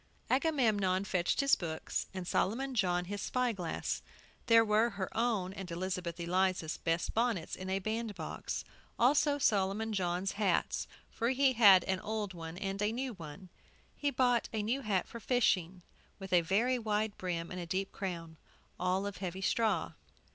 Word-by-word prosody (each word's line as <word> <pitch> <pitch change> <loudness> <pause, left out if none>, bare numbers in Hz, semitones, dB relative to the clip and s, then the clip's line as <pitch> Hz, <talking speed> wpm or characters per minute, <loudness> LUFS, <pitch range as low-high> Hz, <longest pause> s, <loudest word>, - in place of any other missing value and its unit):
Agamemnon 220 - +2
fetched 180 +5 +1
his 275 0 +5
books, 160 -3 -3
and 185 -2 -6
Solomon 260 +10 0
John 180 -5 +1
his 205 +2 -5
spy 250 -1 0
glass. 180 -6 -3 0.5
There 230 -1 +7
were 215 +2 +3
her 190 -5 -5
own 220 -5 0
and 190 -2 -7
Elizabeth 175 0 -3
Eliza's 180 -1 0
best 165 +1 -1
bonnets 225 -7 0
in 185 0 -6
a 190 - +1
bandbox; 215 +1 -4 0.3
also 285 +4 +4
Solomon 210 -2 +1
John's 185 0 0
hats, 200 -4 0 0.2
for 230 - 0
he 265 0 +3
had 200 -6 +8
an 190 -1 -1
old 210 -1 -3
one 165 0 -7
and 195 0 -3
a 210 +1 +2
new 255 +2 -3
one. 175 0 -10 0.5
He 290 - 0
bought 245 -3 +2
a 220 -2 -2
new 245 +6 0
hat 200 -7 0
for 235 - -8
fishing, 190 -7 +1 0.3
with 195 -2 -7
a 175 - +6
very 230 +9 +1
wide 215 -1 -1
brim 170 -2 -3
and 180 -2 -5
deep 190 +1 -1
crown; 170 -4 -5 0.4
all 185 +2 +1
of 200 -1 -4
heavy 185 0 -4
straw. 210 -3 +1
195 Hz, 160 wpm, -33 LUFS, 180-230 Hz, 0.5 s, had